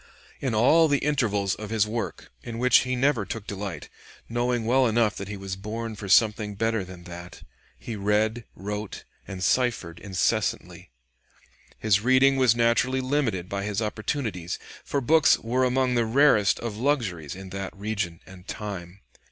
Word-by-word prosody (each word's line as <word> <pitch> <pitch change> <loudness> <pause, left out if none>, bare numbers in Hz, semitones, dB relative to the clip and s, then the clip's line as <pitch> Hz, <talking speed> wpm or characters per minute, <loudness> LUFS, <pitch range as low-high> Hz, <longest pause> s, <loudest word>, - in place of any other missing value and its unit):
In 130 -5 -1
all 155 +9 +5
the 145 -1 +3
intervals 110 -10 0
of 105 -1 -7
his 110 -2 +2
work 105 -5 -5
in 115 - -7
which 125 +2 +5
he 130 +1 0
never 130 -3 +2
took 105 +1 -6
delight, 100 -7 -5 0.4
knowing 120 0 -1
well 130 +2 +4
enough 110 -2 +2
that 100 - -5
he 105 0 -6
was 95 -1 -5
born 110 +3 -5
for 100 -1 -7
something 105 -1 +3
better 110 0 0
than 90 -1 -11
that 85 0 -10 0.3
he 115 - -6
read, 105 +3 0
wrote, 105 +1 -5 0.2
and 95 -1 -6
ciphered 115 -11 0
incessantly. 95 -3 -1 0.9
His 105 -2 +2
reading 130 +3 +4
was 130 -3 +4
naturally 120 +3 +2
limited 130 -9 -1
by 100 +1 -3
his 105 -1 -2
opportunities, 110 - -3 0.3
for 140 - -2
books 155 +4 +5
were 125 +3 0
among 130 0 +2
the 120 -1 +2
rarest 110 -5 +4
of 115 -3 -4
luxuries 110 - -1
in 95 0 -10
that 95 0 -6
region 100 -5 -3
and 95 0 -14
time. 100 -3 -6
110 Hz, 160 wpm, -26 LUFS, 100-125 Hz, 0.9 s, all